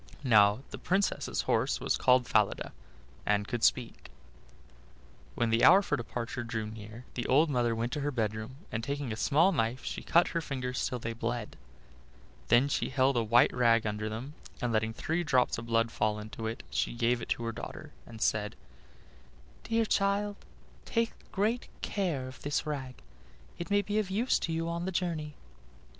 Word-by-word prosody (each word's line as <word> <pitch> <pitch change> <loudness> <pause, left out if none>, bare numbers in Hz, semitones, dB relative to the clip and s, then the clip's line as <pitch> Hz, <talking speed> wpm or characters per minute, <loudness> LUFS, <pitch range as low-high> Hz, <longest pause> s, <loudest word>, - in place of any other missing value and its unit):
Now 105 -1 +5
the - - -7
Princess's 195 +2 0
horse - - +1
was - - 0
called 125 -1 +4
Falada, - - +1 0.5
and 105 0 +1
could 120 -2 -3
speak. 125 -3 +1 1.3
When 120 -1 +1
the 115 +1 +3
hour 190 +5 +8
for - - 0
departure 120 0 -4
drew 115 -2 -3
near 110 +2 -9
the 120 - -3
old 150 +4 +4
mother 120 -3 +1
went 115 +2 -2
to 150 - -2
her 145 +1 -1
bedroom, 110 -1 -2 0.2
and 115 - -3
taking 140 -2 -3
a - - -4
small 155 - +3
knife 120 -5 -1
she - - -4
cut 170 +1 +3
her 165 - -1
fingers 130 -4 -2
till 125 - -3
they 115 -1 -4
bled; 115 +1 -3 0.9
then 120 +5 +5
she 145 - -1
held 135 0 +2
a 120 - +3
white 115 +2 +4
rag 115 -2 +3
under 105 0 -2
them, 120 +7 -6 0.3
and 120 -2 -1
letting 110 0 +1
three 160 +9 -2
drops 130 -7 +2
of 115 - -8
blood 115 0 +2
fall 105 -1 0
into 110 +1 -6
it, 115 - -5
she - - -1
gave 120 0 +1
it - - -7
to 120 - -1
her 115 - -1
daughter, 115 - -8 0.2
and 110 -1 -5
said: 105 -1 0 1.1
"Dear 225 0 +1
child, 200 0 +1 0.5
take 230 0 0 0.2
great 215 +5 0 0.2
care 165 -10 -1
of 130 - -11
this 145 0 -1
rag: 135 -4 -4 0.6
it 170 - -5
may 205 0 +3
be 210 +2 0
of 205 -3 -2
use 225 +7 +1
to 170 - -2
you 165 0 -1
on 170 +1 -2
the 190 - -2
journey." 165 -5 -2
125 Hz, 180 wpm, -30 LUFS, 115-165 Hz, 1.3 s, hour